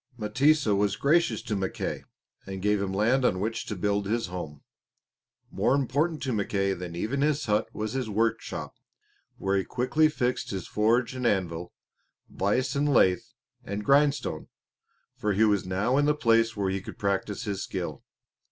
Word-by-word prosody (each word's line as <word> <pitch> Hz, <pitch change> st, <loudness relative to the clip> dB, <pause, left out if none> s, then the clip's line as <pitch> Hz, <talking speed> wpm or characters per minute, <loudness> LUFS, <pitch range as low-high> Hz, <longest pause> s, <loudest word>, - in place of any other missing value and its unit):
M'tesa 130 Hz, +2 st, +2 dB
was 100 Hz, 0 st, +1 dB
gracious 140 Hz, -5 st, +2 dB
to 110 Hz, -, -2 dB
Mackay, 95 Hz, -1 st, -3 dB, 0.4 s
and 95 Hz, -1 st, -5 dB
gave 105 Hz, -1 st, +2 dB
him 100 Hz, -1 st, -2 dB
land 115 Hz, +7 st, +2 dB
on 95 Hz, -7 st, +2 dB
which 110 Hz, +3 st, -3 dB
to 105 Hz, -, -3 dB
build 100 Hz, +1 st, 0 dB
his 115 Hz, +2 st, 0 dB
home. 75 Hz, -6 st, -7 dB, 0.9 s
More 135 Hz, -, +2 dB
important 145 Hz, +4 st, 0 dB
to 130 Hz, -3 st, -1 dB
Mackay 100 Hz, -2 st, 0 dB
than 90 Hz, -2 st, -6 dB
even 115 Hz, +10 st, -2 dB
his 150 Hz, 0 st, +1 dB
hut 105 Hz, 0 st, +1 dB
was 110 Hz, 0 st, -4 dB
his 130 Hz, -4 st, -2 dB
workshop, 115 Hz, +2 st, -1 dB, 0.6 s
where 95 Hz, 0 st, 0 dB
he 95 Hz, -, +1 dB
quickly 155 Hz, +8 st, +2 dB
fixed 125 Hz, -4 st, -1 dB
his 95 Hz, -3 st, -4 dB
forge 115 Hz, +4 st, +2 dB
and 125 Hz, -2 st, -1 dB
anvil, 90 Hz, -4 st, -1 dB, 0.6 s
vise 105 Hz, +9 st, 0 dB
and 145 Hz, +1 st, +1 dB
lathe, 90 Hz, -8 st, +4 dB, 0.4 s
and 100 Hz, +1 st, -5 dB
grindstone, 140 Hz, -, +2 dB, 0.7 s
for 105 Hz, -1 st, 0 dB
he 105 Hz, +3 st, +3 dB
was 105 Hz, -4 st, +2 dB
now 105 Hz, +8 st, +1 dB
in 145 Hz, -, +3 dB
the 150 Hz, 0 st, +3 dB
place 115 Hz, -4 st, +2 dB
where 95 Hz, -2 st, 0 dB
he 95 Hz, 0 st, -2 dB
could -, -, -9 dB
practise 100 Hz, 0 st, -1 dB
his 100 Hz, -3 st, -3 dB
skill. -, -, -5 dB
105 Hz, 170 wpm, -27 LUFS, 100-130 Hz, 0.9 s, lathe